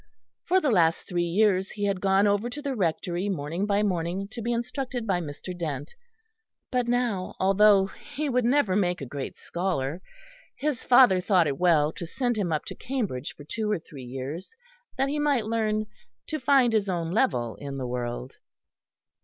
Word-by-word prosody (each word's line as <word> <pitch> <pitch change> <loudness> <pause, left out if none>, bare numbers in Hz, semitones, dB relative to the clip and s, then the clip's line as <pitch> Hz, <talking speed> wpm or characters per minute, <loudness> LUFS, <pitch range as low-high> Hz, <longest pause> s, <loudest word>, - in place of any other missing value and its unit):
For 370 +3 +4
the 295 -7 +1
last 165 -5 +3
three 175 -1 -1
years 190 +1 +2
he 205 - -6
had 195 -2 -1
gone 195 +1 +4
over 205 +3 +1
to 285 - -6
the 285 -2 -3
Rectory 180 -1 -1
morning 170 +2 -2
by 205 0 +2
morning 185 0 -1
to 230 +2 -7
be 235 +2 -1
instructed 245 +1 -3
by 185 -4 +1
Mr. 160 +4 -7
Dent; 150 -5 -4 0.8
but 250 -2 +1
now, 240 -6 0
although 195 +1 +5 0.3
he 300 +3 -1
would 250 -2 +1
never 240 -6 +3
make 180 -3 +1
a 140 - -5
great 135 +2 -6
scholar, 170 -3 -2 0.5
his 290 -4 -2
father 245 -7 +6
thought 180 -2 +3
it 140 -2 -2
well 160 -4 +4
to 170 - -7
send 245 +6 -1
him 195 -6 -1
up 155 - -1
to - - -6
Cambridge 215 - -3
for 145 - -11
two 215 +8 -3
or 210 - +2
three 155 -4 -11
years, 135 - -6 0.4
that 270 +1 +2
he 295 +2 -1
might 285 -6 +2
learn 215 -1 0 0.4
to 310 - -3
find 260 -3 +4
his 205 -3 +1
own 170 -2 -1
level 125 - +1
in 140 -1 -6
the 130 - -3
world. 120 +1 -4
195 Hz, 185 wpm, -27 LUFS, 165-240 Hz, 0.8 s, father